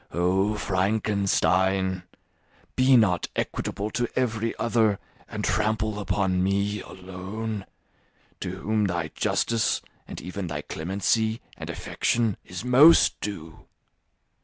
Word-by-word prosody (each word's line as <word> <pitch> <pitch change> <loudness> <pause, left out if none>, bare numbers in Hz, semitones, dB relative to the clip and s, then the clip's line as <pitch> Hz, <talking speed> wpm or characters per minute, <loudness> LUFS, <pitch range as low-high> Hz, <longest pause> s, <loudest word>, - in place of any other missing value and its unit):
Oh, 95 +4 +1
Frankenstein, 95 -2 +1 0.7
be 130 0 +5
not 90 -7 +2
equitable 105 +2 -3
to 120 0 0
every 115 -3 0
other 110 -3 +2 0.3
and - - -5
trample 110 -1 0
upon 95 -2 0
me 100 +1 0
alone, 95 +3 -6 0.7
to 90 +1 -4
whom 110 0 +1
thy 85 -4 -2
justice, 115 +5 0 0.3
and - - -7
even 90 +1 -5
thy 75 -2 -4
clemency 105 +6 0 0.2
and - - -8
affection, 115 -4 0
is 90 +6 -7
most 140 +7 +6
due. 80 -6 -7
100 Hz, 110 wpm, -26 LUFS, 95-110 Hz, 0.7 s, most